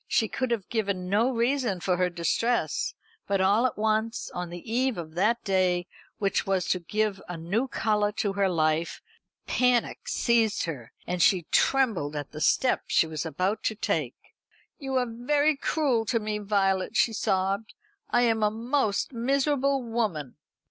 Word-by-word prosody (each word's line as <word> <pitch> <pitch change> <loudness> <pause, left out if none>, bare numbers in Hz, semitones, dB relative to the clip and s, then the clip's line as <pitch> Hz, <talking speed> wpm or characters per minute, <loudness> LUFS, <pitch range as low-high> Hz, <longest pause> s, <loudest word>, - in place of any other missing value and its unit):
She 220 - +2
could 255 +4 -2
have 230 -5 -2
given 200 -5 -2
no 225 +5 +3
reason 240 -4 0
for 180 0 0
her 180 0 +2
distress; 235 - 0 0.3
but 195 -1 +1
all 205 +6 +4
at - - -7
once, 220 +1 -1
on 180 -1 -4
the 175 0 -8
eve 255 -1 +1
of 160 -2 -7
that 215 +7 +1
day 185 -3 +1 0.3
which 195 -1 0
was 190 -2 +1
to 185 - +1
give 210 +2 -1
a 175 - -4
new 195 +11 -1
colour 210 -4 0
to 205 -2 -1
her 195 -1 +1
life, 160 -1 0 0.5
panic 250 -2 +1
seized 230 -3 +2
her, 140 -9 -6
and 180 0 -2
she 180 -3 +4
trembled 215 - +2
at 145 -1 -5
the 155 - -8
step 255 +10 +2
she - - +3
was 160 0 -4
about 185 +7 -1
to 220 - 0
take. - - -1 0.6
"You 270 -3 -4
are 255 -1 +2
very 285 +6 +1
cruel 275 -5 0
to 230 +1 +1
me, 210 -1 -3
Violet," 195 -2 0
she 230 - +3
sobbed. 195 +1 -1 0.3
"I 240 - +3
am 225 -2 +2
a 210 - +4
most 230 +1 -1
miserable 275 +2 +1
woman." 215 - -2
210 Hz, 170 wpm, -27 LUFS, 185-240 Hz, 0.6 s, all